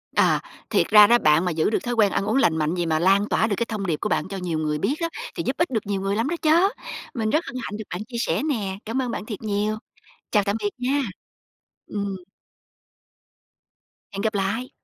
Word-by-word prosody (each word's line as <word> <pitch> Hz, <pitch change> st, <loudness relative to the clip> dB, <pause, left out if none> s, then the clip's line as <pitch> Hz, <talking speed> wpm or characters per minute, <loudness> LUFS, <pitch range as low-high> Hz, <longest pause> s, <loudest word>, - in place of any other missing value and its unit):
Ờ, -, -, +4 dB, 0.3 s
thiệt -, -, +2 dB
ra 210 Hz, -1 st, +8 dB
đó 240 Hz, -, +6 dB
bạn 155 Hz, -1 st, +3 dB
mà 180 Hz, -, +1 dB
giữ 160 Hz, +3 st, +1 dB
được -, -, +1 dB
thói 240 Hz, 0 st, -2 dB
quen 210 Hz, -4 st, +3 dB
ăn -, -, 0 dB
uống 215 Hz, +5 st, 0 dB
lành 160 Hz, -11 st, +3 dB
mạnh 155 Hz, +2 st, 0 dB
vậy, 175 Hz, -1 st, -1 dB
mà 160 Hz, -1 st, +1 dB
lan 195 Hz, +4 st, +3 dB
tỏa 220 Hz, -, +2 dB
được 205 Hz, -, 0 dB
cái 235 Hz, -, 0 dB
thông 215 Hz, -4 st, -4 dB
điệp 160 Hz, -4 st, 0 dB
của -, -, -1 dB
bạn 155 Hz, -, 0 dB
cho 195 Hz, 0 st, -5 dB
nhiều 170 Hz, -4 st, -2 dB
ngươi 150 Hz, -1 st, -1 dB
biết 230 Hz, -, 0 dB
đó, 335 Hz, -, 0 dB, 0.3 s
thì -, -, -2 dB
giúp 265 Hz, -, -1 dB
ích 340 Hz, -, +1 dB
được 220 Hz, -3 st, -1 dB
nhiều 195 Hz, -1 st, -2 dB
người 195 Hz, +1 st, 0 dB
lắm 225 Hz, +4 st, 0 dB
đó 345 Hz, -, 0 dB
chớ. 330 Hz, +5 st, +5 dB, 0.5 s
Mình 225 Hz, -5 st, -1 dB
rất 310 Hz, +8 st, +1 dB
hân 275 Hz, -, -8 dB
hạnh 210 Hz, -, -5 dB
được 220 Hz, -, -5 dB
bạn 180 Hz, -, -4 dB
chia 240 Hz, -2 st, -6 dB
sẻ 165 Hz, -4 st, 0 dB
nè, 210 Hz, -11 st, -2 dB
cám 235 Hz, +5 st, -1 dB
ơn 245 Hz, -2 st, -2 dB
bạn -, -, -4 dB
thiệt 215 Hz, -3 st, -6 dB
nhiều. 210 Hz, 0 st, -1 dB, 0.5 s
Chào 210 Hz, -2 st, +4 dB
tạm 200 Hz, +1 st, 0 dB
biệt 205 Hz, 0 st, 0 dB
nha. 265 Hz, +3 st, +1 dB, 0.9 s
Ừm. 200 Hz, -2 st, -3 dB, 2.0 s
Hẹn 200 Hz, -, -4 dB
gặp 220 Hz, 0 st, 0 dB
lại. 210 Hz, +6 st, -1 dB
210 Hz, 245 wpm, -24 LUFS, 190-235 Hz, 2.0 s, ra